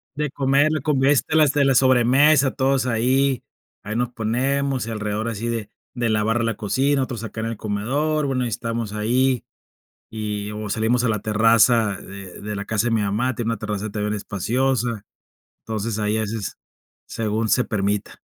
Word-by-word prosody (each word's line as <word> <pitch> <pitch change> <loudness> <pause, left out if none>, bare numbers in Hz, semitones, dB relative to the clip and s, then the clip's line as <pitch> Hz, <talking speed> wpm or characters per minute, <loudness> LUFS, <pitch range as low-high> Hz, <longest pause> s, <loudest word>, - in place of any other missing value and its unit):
De 150 -1 -2
comer, 140 +2 +2
convives 140 -2 +3
de 150 -2 +3
la 135 -1 +3
sobremesa, 130 +3 +5
todos 135 -1 +1
ahí, 130 +3 +1 0.4
ahí 105 +1 -5
nos 120 0 0
ponemos, 130 +3 -1
y - - -4
alrededor 105 0 -2
así 115 +1 -4
de 115 -3 -3 0.3
de 120 -2 0
lavar 110 +2 +1
la 115 - 0
cocina, 135 +6 +1
otros 120 -4 -5
acá 110 0 -6
en 115 - -2
el 115 -1 -4
comedor. 135 +10 -1
Bueno, 130 -2 0
y - - -1
estamos 115 -1 -3
ahí, 125 +3 +1 0.7
y 105 -1 -4
o 105 0 -5
salimos 115 +3 +1
a - - +2
la 110 -1 +1
terraza 110 0 +3
de 95 -2 -10
de 105 0 -5
la 100 - -4
casa 110 +2 0
de - - -1
mi 110 - +2
mamá, 110 +6 0
tiene 115 -2 -3
una 115 - -2
terraza 105 -1 -4
también 105 0 -2
espaciosa. 115 +3 -1 0.6
Entonces, 110 0 -3
ahí 105 0 0
a - - 0
veces, 110 -1 -4 0.5
según 110 0 -2
se 125 +3 +3
permita. 100 -1 -2
115 Hz, 175 wpm, -22 LUFS, 105-130 Hz, 0.7 s, sobremesa